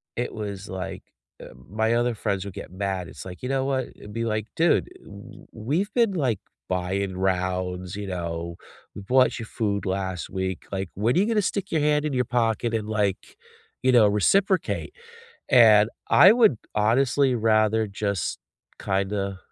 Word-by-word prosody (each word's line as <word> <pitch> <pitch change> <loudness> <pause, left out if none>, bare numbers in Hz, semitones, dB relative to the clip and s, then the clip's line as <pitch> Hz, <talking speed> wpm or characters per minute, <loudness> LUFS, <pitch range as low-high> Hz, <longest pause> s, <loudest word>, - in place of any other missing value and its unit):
it 120 - -3
was 100 -2 -6
like, 95 0 -6 0.4
uh - - -9 0.2
my 110 +3 +1
other 120 0 +1
friends 100 -3 -2
would 100 - -7
get 100 - -9
mad, 95 -1 -3
it's - - -10
like, 90 -1 -9
you 125 - -4
know 135 0 0
what, 130 -2 -1
it'd 105 0 -12
be 115 0 -2
like, 110 -1 -2
"Dude, 165 0 +2
w - - -13
we've 155 - -2
been, 230 -5 +2
like, 130 - 0 0.3
buying 95 +1 -2
rounds, 95 0 -1
you 105 -1 -5
know, 85 -2 -4 0.4
we - - -7
bought 125 +6 +2
you 115 - -5
food 105 -2 -2
last 95 -1 -3
week, 95 -1 -4
like, 95 -2 -3
when 110 +7 0
are - - +4
you 200 - +3
gonna 220 -1 +1
stick 200 0 -3
your 160 - +1
hand 150 0 +2
in 150 - -2
your 125 -1 +1
pocket 115 0 0
and, 110 -2 -2
like, 105 -3 -2 0.5
you 130 - +4
know, 120 -4 +6
reciprocate?" 185 - +1 0.6
And 110 -5 +6 0.2
I 190 +4 +8
would 220 - +4 0.2
honestly 130 +5 +2
rather 110 -1 +2
just, 100 -3 -3 0.4
kinda, 100 0 -1
105 Hz, 170 wpm, -25 LUFS, 95-125 Hz, 0.6 s, I